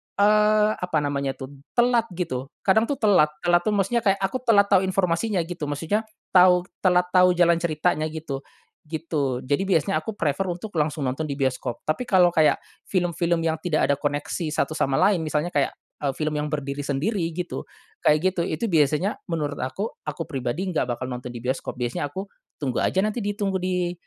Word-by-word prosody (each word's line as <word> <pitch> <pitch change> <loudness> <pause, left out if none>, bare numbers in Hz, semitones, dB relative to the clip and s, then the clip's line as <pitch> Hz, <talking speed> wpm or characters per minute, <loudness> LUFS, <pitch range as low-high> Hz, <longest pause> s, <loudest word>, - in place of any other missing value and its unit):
eee, 210 +1 +4
apa 180 -3 -1
namanya 140 -1 -1
tuh, 130 +1 -8 0.2
telat 240 -1 +3
gitu. 135 -7 -3 0.2
Kadang 220 +4 +3
tuh 285 - -1
telat. 205 - +5 0.2
Telat 175 0 +4
tuh 210 - +2
maksudnya 205 +4 +1
kayak, 195 -4 +2
aku 255 +7 0
telat 200 -3 +5
tahu 190 -1 +4
informasinya, 185 +1 +1
gitu. 165 -3 -5
Maksudnya 165 +10 -1 0.2
tahu 180 -1 +6 0.2
telat 180 -1 +2
tahu 180 -1 +5
jalan 170 -1 +4
ceritanya 155 -2 0
gitu. 155 -3 -5 0.5
Gitu. 150 -5 -2
Jadi 145 +8 0
biasanya, 190 +1 +2
aku 220 - -6
prefer 165 +1 -1
untuk 180 +4 -5
langsung 150 -1 -1
nonton 135 +4 -2
di 140 - -3
bioskop. 130 -3 -2
Tapi 200 +11 -2
kalau 180 -5 +5
kayak, 155 -2 +3 0.2
film-film 170 -2 0
yang 160 -1 0
tidak 155 -5 +1
ada - - +3
koneksi 145 +3 -2
satu - - 0
sama 140 -3 0
lain, 200 -4 +4
misalnya 155 +2 -1
kayak, 145 -2 +2 0.3
eee, 140 -2 0
film 155 -1 -1
yang 150 0 -2
berdiri 145 -1 -3
sendiri, 155 +9 -1
gitu. 175 - -4 0.4
Kayak 165 +5 +3
gitu. 175 - -1
Itu 170 +4 -2
biasanya, 155 +6 +2
menurut 150 -4 -2
aku, 195 - -3
aku 155 +2 -5
pribadi 135 +3 -3
enggak 165 -9 -1
bakal 120 +1 -3
nonton 125 0 -5
di 120 - -7
bioskop. 130 -1 -3
Biasanya 125 +3 -2
aku, 190 +6 -5 0.3
tunggu 130 -5 -1
aja 190 +2 +2
nanti 215 +3 -2
ditunggu 200 -2 -1
di 180 -1 -1
170 Hz, 185 wpm, -24 LUFS, 145-190 Hz, 0.5 s, tahu